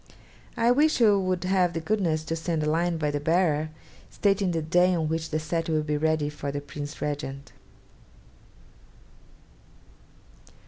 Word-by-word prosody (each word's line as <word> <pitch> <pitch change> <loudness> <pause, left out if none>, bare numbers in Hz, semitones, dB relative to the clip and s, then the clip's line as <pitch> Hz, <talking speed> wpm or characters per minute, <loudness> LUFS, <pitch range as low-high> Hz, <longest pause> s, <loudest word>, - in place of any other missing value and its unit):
'I 235 +1 +4
wish 300 +4 +3
you 210 -4 +5
would 185 -1 -1
have 180 -2 +2
the 165 - -2
goodness 165 -4 0
to 165 - -3
send 160 -1 -2
a - - 0
line 170 +1 0
by 150 -2 -1
the 145 - -2
bearer, 155 -1 +1 0.4
stating 200 -2 +1
the 165 -2 -1
day 180 +3 +3
on 160 -2 0
which 160 +1 -2
the 155 - -1
set 165 +1 -2
will 155 -1 +1
be 150 0 -1
ready 155 0 +1
for 145 -1 -5
the 145 - -3
Prince 145 0 -8
Regent.' 140 -2 -4
160 Hz, 155 wpm, -26 LUFS, 150-180 Hz, 0.4 s, you